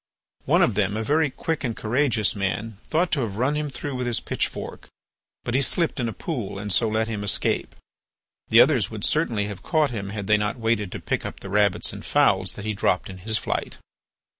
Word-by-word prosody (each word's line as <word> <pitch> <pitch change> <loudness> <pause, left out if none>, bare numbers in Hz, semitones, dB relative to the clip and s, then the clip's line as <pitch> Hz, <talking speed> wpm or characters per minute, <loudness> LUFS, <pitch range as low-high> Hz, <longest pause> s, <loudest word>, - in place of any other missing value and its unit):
One - - +4
of 115 - +3
them, 100 +1 0
a 110 - -1
very 150 +5 +2
quick 155 +4 -3
and 120 -4 -2
courageous 115 -2 +1
man, 100 +2 -2
thought 170 +3 +1
to 150 - +2
have 105 -4 -3
run 130 +5 +1
him 150 0 -2
through 140 +2 -5
with 125 -1 -2
his 120 - +1
pitchfork; - - -4 0.6
but 120 - -3
he 135 - +3
slipped 165 +2 +1
in 120 -2 0
a - - -4
pool 120 - -4
and 105 -1 -2
so 115 - +3
let 110 +1 0
him 105 -2 -3
escape. 100 - 0 0.7
The - - +7
others - - +3
would - - -7
certainly 105 -3 +1
have 100 -2 -6
caught 155 -4 +1
him 100 -4 -4
had 100 -1 -4
they 105 +1 +4
not 105 +3 -1
waited 110 -4 0
to - - -5
pick - - -2
up - - -7
the 95 - -7
rabbits 105 -2 +2
and - - -8
fowls 95 -2 +2
that 105 - -8
he 110 - -1
dropped 95 -1 0
in 95 - -10
his 110 +3 +1
flight. - - -3
110 Hz, 220 wpm, -24 LUFS, 100-130 Hz, 0.7 s, The